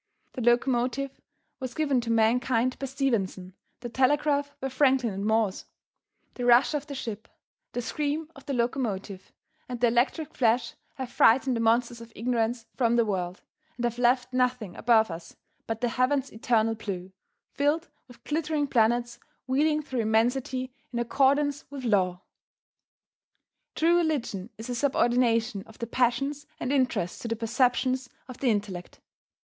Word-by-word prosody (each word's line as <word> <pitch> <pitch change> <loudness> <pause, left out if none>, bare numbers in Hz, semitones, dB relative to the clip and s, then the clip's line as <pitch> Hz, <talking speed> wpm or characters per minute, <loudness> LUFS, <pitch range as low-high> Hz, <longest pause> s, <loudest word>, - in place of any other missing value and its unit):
The 255 - -5
locomotive 245 +3 +1 0.4
was 255 -2 -5
given 285 -5 +1
to 235 - -6
mankind 235 +2 +2
by 275 - -3
Stephenson; 220 -9 -1 0.3
the 240 - -5
telegraph 285 +3 +1
by 270 - -3
Franklin 260 -4 +2
and 200 +2 -3
Morse. 220 -3 +1 0.7
The 250 - -5
rush 245 +4 +5
of 295 0 -2
the 285 - -6
ship, 220 -4 -6 0.5
the 245 - -2
scream 300 +4 -2
of 275 - -15
the 280 - -1
locomotive, 220 -6 -2 0.4
and 245 -1 -4
the 240 0 +4
electric 255 +6 0
flash 235 -1 +1 0.2
have 260 -2 -6
frightened 255 +2 +4
the - - -1
monsters 235 +1 +2
of 230 0 -11
ignorance 230 0 -1
from 235 -2 +2
the 235 -1 +3
world, 185 -3 -3 0.3
and 240 - -4
have 240 0 -2
left 250 +1 +2
nothing 250 -6 0
above 220 -4 +3
us 165 0 -9 0.3
but 225 0 -3
the 245 - +1
heaven's 260 +3 +1
eternal 225 0 +1
blue, 190 -4 -6 0.4
filled 295 +4 0 0.2
with 245 - -17
glittering 305 -1 -1
planets 240 -1 +1 0.3
wheeling 300 +4 +1
through 260 -4 -3
immensity 250 +3 0 0.2
in 240 - -4
accordance 280 +4 +2
with 275 -2 -7
Law. 185 -6 +1 1.5
True 335 +2 +4
religion 260 - -1
is 220 - -7
a 250 - -3
subordination 240 -4 +2
of 220 - -15
the 235 - -3
passions 255 +5 0
and 255 - -1
interests 255 -10 0
to - - -5
the 230 - -1
perceptions 250 +3 +1 0.2
of 255 -2 -10
the 265 - +2
intellect. 200 -5 -3
245 Hz, 155 wpm, -27 LUFS, 225-270 Hz, 1.5 s, rush